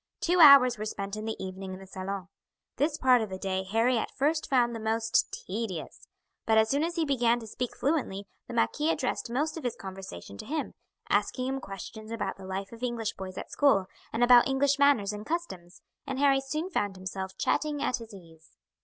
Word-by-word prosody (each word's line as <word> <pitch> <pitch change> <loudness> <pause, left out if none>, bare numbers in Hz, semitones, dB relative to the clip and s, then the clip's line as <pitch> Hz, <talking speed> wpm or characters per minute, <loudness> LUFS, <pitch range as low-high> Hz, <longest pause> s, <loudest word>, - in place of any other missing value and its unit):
Two 355 +1 +1
hours 275 -7 +8
were 215 - -3
spent 200 -1 -4
in 215 0 -5
the 220 - -2
evening 190 0 -6
in 185 - -8
the 195 - -11
salon. 190 0 -5 0.5
This 300 +1 +1
part 255 -4 +4
of 220 - -3
the 190 - -5
day 190 0 -2
Harry 225 +5 +2
at - - -3
first 300 +4 +1
found 245 -3 +3
the 230 - -5
most 225 +1 +1
tedious; 190 -4 -5 0.4
but 220 0 +4
as 220 0 +4
soon 285 +2 +2
as 340 +1 -2
he 330 -2 +1
began 240 -4 +2
to 230 - -9
speak 240 +3 -4
fluently 260 -10 -1 0.2
the - - -7
marquis 295 - +1
addressed 255 -6 -1
most 300 +7 -1
of 325 - -7
his 245 -2 -2
conversation 190 - -9
to - - -7
him, 310 +1 -3 0.4
asking 255 - +1
him 270 +1 -2
questions 205 +2 -8
about 230 0 -3
the 190 -1 -10
life 195 +1 -4
of 230 0 -11
English 235 -3 -2
boys 185 -1 -8
at - - -7
school 270 -10 +3 0.3
and 230 +2 +1
about 245 +1 +7
English 280 +1 +2
manners 235 -8 +4
and 210 0 -6
customs, 190 - -5 0.2
and 265 - -3
Harry 275 -1 +4
soon 310 +7 -4
found 205 - -1
himself 190 0 -6
chatting 300 -2 0
at 250 - +1
his 230 -1 -11
ease. 165 -4 -15
230 Hz, 210 wpm, -29 LUFS, 195-275 Hz, 0.5 s, hours